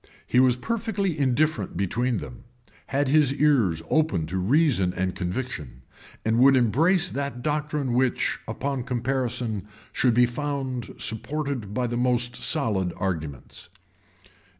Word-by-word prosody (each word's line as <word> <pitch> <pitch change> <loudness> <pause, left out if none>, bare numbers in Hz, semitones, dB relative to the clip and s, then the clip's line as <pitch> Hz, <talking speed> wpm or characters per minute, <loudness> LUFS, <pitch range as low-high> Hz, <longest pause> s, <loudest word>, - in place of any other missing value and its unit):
He 125 - +2
was 130 -1 +5
perfectly 205 - -2
indifferent 140 - 0
between 115 +6 0
them; 120 +3 -9 0.4
had 140 +1 0
his 145 -2 +4
ears 120 - +2
open 150 - +1
to 95 +4 -3
reason 115 - +2
and 95 0 -1
conviction; 90 - -5 0.4
and 110 +1 +2
would 135 +2 +7
embrace 160 - +3
that 140 -3 -4
doctrine 150 -3 -1
which, 130 0 +1
upon 135 -1 -3
comparison, 120 -4 -2 0.3
should 125 -3 +2
be 125 0 +6
found 130 -2 -4
supported 120 -1 -3
by 125 - 0
the 120 0 -2
most 120 0 +1
solid 105 - +1
arguments. 80 -5 -5
125 Hz, 125 wpm, -25 LUFS, 105-140 Hz, 0.4 s, would